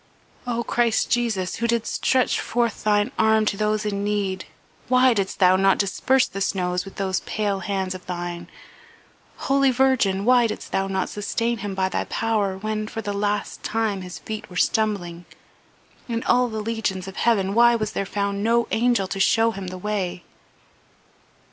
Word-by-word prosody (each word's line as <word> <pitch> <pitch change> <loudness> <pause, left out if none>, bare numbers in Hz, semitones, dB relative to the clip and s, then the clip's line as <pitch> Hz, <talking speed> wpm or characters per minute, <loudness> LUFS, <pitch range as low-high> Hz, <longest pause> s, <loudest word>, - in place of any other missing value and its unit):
"O 235 -1 -1
Christ 235 -1 +1
Jesus, 220 -7 0
who 235 - 0
didst 235 -1 -1
stretch 255 -1 +2
forth 240 -2 -1
Thine 210 +2 +2
arm 220 0 +4
to 205 - 0
those 215 +1 0
in 200 -1 -2
need, 200 -2 -1 0.4
why 255 0 +5
didst 195 -3 -2
Thou 185 -1 +5
not 195 0 +3
disperse 250 +6 +2
the 195 - -6
snows 180 -2 -1
with 195 - -11
those 190 -1 -1
pale 205 -2 -2
hands 190 0 -2
of 185 -1 -10
Thine? 175 -1 -5 1.0
Holy 275 0 +3
Virgin, 245 -7 +2
why 245 -1 +5
didst 215 - -7
Thou 195 0 0
not 190 -1 -1
sustain 230 +3 -2
him 200 -1 -4
by 190 0 +1
Thy 190 - -2
power 210 -4 -1
when, 215 +1 -3
for 225 +1 -6
the 205 0 -3
last 205 0 -2
time, 220 -3 -1
his 180 -1 -8
feet 215 -1 -7
were 180 - -12
stumbling? 180 -7 0 0.8
In 230 -1 -2
all 250 0 +3
the 220 -1 -4
legions 210 -4 -2
of 195 - -9
heaven 200 -5 +2
why 235 +1 +5
was 215 -2 -2
there 195 - -3
found 200 0 -2
no 235 +1 +2
angel 235 -3 +2
to 195 +1 -5
show 225 +4 +3
him 195 -3 -7
the 185 0 -6
way?" 185 -3 -3
210 Hz, 175 wpm, -23 LUFS, 190-230 Hz, 1.0 s, why